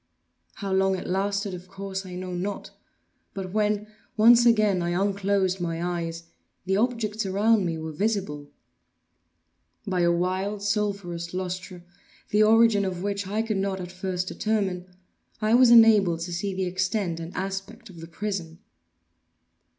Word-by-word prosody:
How 195 -2 -4
long 190 0 +2
it - - -7
lasted 200 +1 -1
of 180 0 -8
course, 195 0 -6
I 180 - -8
know 185 0 -5
not; 195 +3 -4 0.6
but 190 -1 -5
when, 210 -1 +1 0.3
once 235 +2 +7
again, 215 -5 +3
I 175 +1 -1
unclosed 195 -2 0
my 175 +1 -2
eyes, 165 0 -5 0.4
the 190 +1 +1
objects 220 -1 0
around 200 +1 +2
me 165 -1 -2
were 160 0 -5
visible. 155 -5 -2 1.4
By 185 -3 0
a 170 0 +4
wild 190 +4 -1
sulphurous 200 -5 -2
lustre, 185 -1 -5 0.5
the 210 - +3
origin 220 -1 +5
of 185 -2 -3
which 200 -1 -2
I 215 +3 -1
could 215 -3 -2
not 195 0 -1
at 180 -1 -7
first 185 0 -3
determine, 195 -5 -1 0.5
I 215 +1 +1
was 250 0 +7
enabled 215 -8 +6
to 175 +1 -4
see 190 +2 -3
the 190 0 -1
extent 185 -1 -1
and 165 +1 -7
aspect 195 +5 -5
of 170 - -13
the 165 - -8
prison. 170 -2 -5
190 Hz, 150 wpm, -26 LUFS, 180-210 Hz, 1.4 s, once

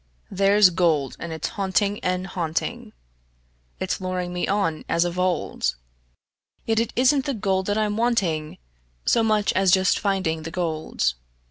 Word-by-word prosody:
There's 195 0 +5
gold, 160 -6 +1
and 170 - -6
it's 160 - -3
haunting 200 +1 0
and 180 0 -1
haunting; 190 +7 -3 0.9
It's 190 0 -2
luring 180 -1 -3
me 180 - -2
on 180 -6 0
as 170 +1 +2
of 175 +1 -3
old; 180 -1 0 0.9
Yet 225 -1 +1
it 230 - -1
isn't 260 +2 +3
the 280 -3 -1
gold 190 -3 0
that 205 +1 0
I'm 210 -1 0
wanting 185 -10 0 0.5
So 235 - +3
much 215 -2 +2
as 190 0 +2
just 190 +1 +4
finding 190 -6 0
the 160 - -6
gold. 160 - -1
190 Hz, 150 wpm, -24 LUFS, 170-210 Hz, 0.9 s, There's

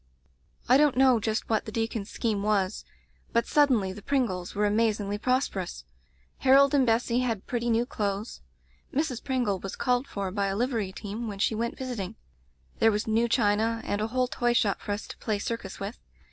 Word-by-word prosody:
"I 255 - +6
don't 290 -3 +3
know 260 -3 +5
just 220 0 -2
what 220 -1 0
the 215 - -6
deacon's 225 -2 -2
scheme 215 -4 -1
was, 200 -1 0 0.5
but 235 - +3
suddenly 250 -11 +3
the 205 - -10
Pringles 200 -9 -1
were 210 +1 +2
amazingly 210 -1 +1
prosperous. 205 - -1 0.5
Harold 275 +1 +5
and 270 -3 +4
Bessy 235 +1 +2
had 230 -6 -1
pretty 240 -1 -2
new 230 +1 +2
clothes. 205 -1 -3 0.5
Mrs. 275 -4 -1
Pringle 245 -8 0
was 195 +1 -6
called 250 +2 0
for 195 -2 -4
by 200 0 0
a 195 - -1
livery 225 -4 -1
team 210 +4 -5
when 205 -2 -5
she 200 - +1
went 235 +2 -2
vis 255 -2 -4
iting. 195 0 -5 0.6
There 225 - +5
was 210 0 -1
new 225 +2 +1
china, 225 0 +2
and 205 - -1
a 215 - 0
whole 255 +2 0
toyshop 240 -5 +1
for - - -5
us 205 +1 -3
to - - -10
play 215 -2 -1
circus 205 -2 -5
with. 200 +4 -5
225 Hz, 190 wpm, -27 LUFS, 205-245 Hz, 0.6 s, I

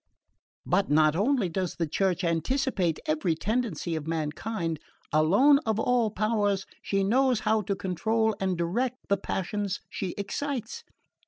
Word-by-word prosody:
"But 200 - +1
not 155 +1 +4
only 225 +2 +2
does 180 +1 -3
the 170 - -1
Church 185 +3 0
anticipate 175 - 0
every 160 +2 0
tendency 200 -4 -2
of 155 -1 -5
mankind; 165 +2 -2 0.3
alone 200 - +5
of 220 -1 0
all 240 -1 +2
powers 205 -2 0 0.2
she 195 -1 0
knows 250 +2 +2
how 215 0 +2
to 200 0 -2
control 220 +5 0
and 190 -2 0
direct 230 +10 -1
the 200 - +3
passions 195 +1 -3
she 185 -3 -4
excites. 255 - -4
200 Hz, 140 wpm, -27 LUFS, 170-225 Hz, 0.3 s, alone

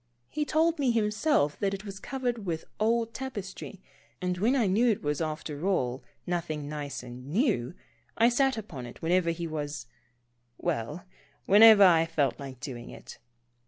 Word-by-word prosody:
He 300 - -2
told 320 +2 +2
me 270 -3 +2
himself 215 - +1
that 195 -1 0
it 195 +2 -10
was 195 -2 -7
covered 245 -2 -3
with 165 -4 -3
old 230 +1 +1
tap 265 0 -6
estry, 195 -1 -7 0.4
and 180 0 -1
when 235 +7 +2
I 245 -5 +2
knew 215 +6 +3
it 215 - 0
was 150 +1 -1
after 155 +1 -3
all, 130 -9 0 0.2
nothing 155 -4 -3
nice 145 -3 -5
and 125 +1 -10
new, 180 - 0 0.4
I 230 - +5
sat 260 +1 +2
upon 145 - -7
it 120 - -13
whenever 175 +1 +2
he 170 +1 -3
was 150 -5 -4 0.4
— 120 - -45 0.3
well, 150 +10 -3 0.4
whenever 210 +1 +8
I 165 -3 +5
felt 150 -5 0
like 135 -3 -8
doing 120 -3 -7
it. - - -11
180 Hz, 170 wpm, -28 LUFS, 150-225 Hz, 0.4 s, whenever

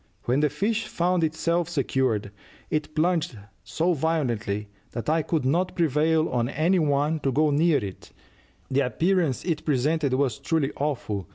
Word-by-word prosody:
When 125 +3 +1
the 150 0 +3
fish 210 +10 -1
found 175 0 +1
itself 165 +2 0
secured, 130 - 0 0.4
it 155 0 -2
plunged 160 -6 +1 0.3
so 175 +2 0
violently 120 -10 -1 0.3
that 120 - -5
I 160 +1 +2
could 155 -3 -1
not 175 +7 +1
prevail 160 0 +2
on 120 -1 0
any 170 +6 +2
one 150 +1 +1
to 135 -2 0
go 150 +3 +2
near 155 +2 +3
it: 95 -2 -9 0.6
the 140 +1 +3
appearance 170 -1 0
it 165 -4 -1
presented 145 0 +1
was 130 -4 0
truly 155 -4 0
awful. 115 - -2
150 Hz, 155 wpm, -25 LUFS, 130-165 Hz, 0.6 s, the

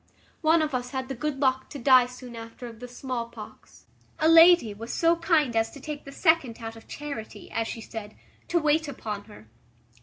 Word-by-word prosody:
One 320 0 +4
of 305 -2 -3
us 250 -1 -2
had 260 0 -4
the - - -2
good 275 +2 -3
luck 260 -1 +1
to 290 - -7
die 255 -1 +6
soon 250 -1 -10
after 230 +2 -9
of 230 -2 -10
the 250 - -7
small 245 -1 -4
pox; - - -13 0.3
a 315 - +2
lady 330 -7 +7
was 225 +3 -7
so 335 0 +3
kind 315 -7 +2
as 225 0 +2
to 280 - -10
take 295 +1 -7
the 275 - -9
second 315 -7 +2
out 225 -1 -7
of 225 - -15
charity, 285 -7 -7
as 225 0 -1
she 225 - -6
said, 215 -1 -8 0.3
to 345 - +1
wait 310 -1 +2
upon 215 -7 -6
her. 205 - -15
255 Hz, 210 wpm, -26 LUFS, 230-300 Hz, 0.3 s, lady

